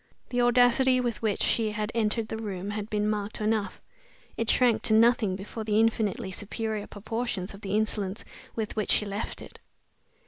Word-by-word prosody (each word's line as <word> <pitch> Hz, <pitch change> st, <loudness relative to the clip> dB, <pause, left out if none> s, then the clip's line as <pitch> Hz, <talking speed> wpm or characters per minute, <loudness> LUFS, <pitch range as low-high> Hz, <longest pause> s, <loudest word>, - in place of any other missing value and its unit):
The 245 Hz, -1 st, +1 dB
audacity 245 Hz, +2 st, +4 dB
with 240 Hz, -3 st, -2 dB
which 215 Hz, -3 st, 0 dB
she 220 Hz, -2 st, +1 dB
had 210 Hz, +1 st, -2 dB
entered 225 Hz, -1 st, 0 dB
the 220 Hz, -, -3 dB
room 200 Hz, -3 st, -4 dB
had 210 Hz, 0 st, -4 dB
been 210 Hz, 0 st, 0 dB
marked 210 Hz, 0 st, -2 dB
enough; 215 Hz, -2 st, -1 dB, 0.6 s
it 230 Hz, 0 st, -1 dB
shrank 235 Hz, -3 st, +4 dB
to 220 Hz, -, +3 dB
nothing 225 Hz, -3 st, +4 dB
before 210 Hz, +3 st, -6 dB
the 215 Hz, 0 st, +2 dB
infinitely 220 Hz, -4 st, +1 dB
superior 215 Hz, +2 st, -3 dB
proportions 215 Hz, -2 st, -4 dB
of 200 Hz, -, -12 dB
the 195 Hz, 0 st, -2 dB
insolence 210 Hz, -2 st, -2 dB, 0.3 s
with 220 Hz, -2 st, -3 dB
which 215 Hz, -2 st, -1 dB
she 210 Hz, -, +4 dB
left 200 Hz, +2 st, -4 dB
it. -, -, -13 dB
215 Hz, 175 wpm, -28 LUFS, 205-230 Hz, 0.6 s, audacity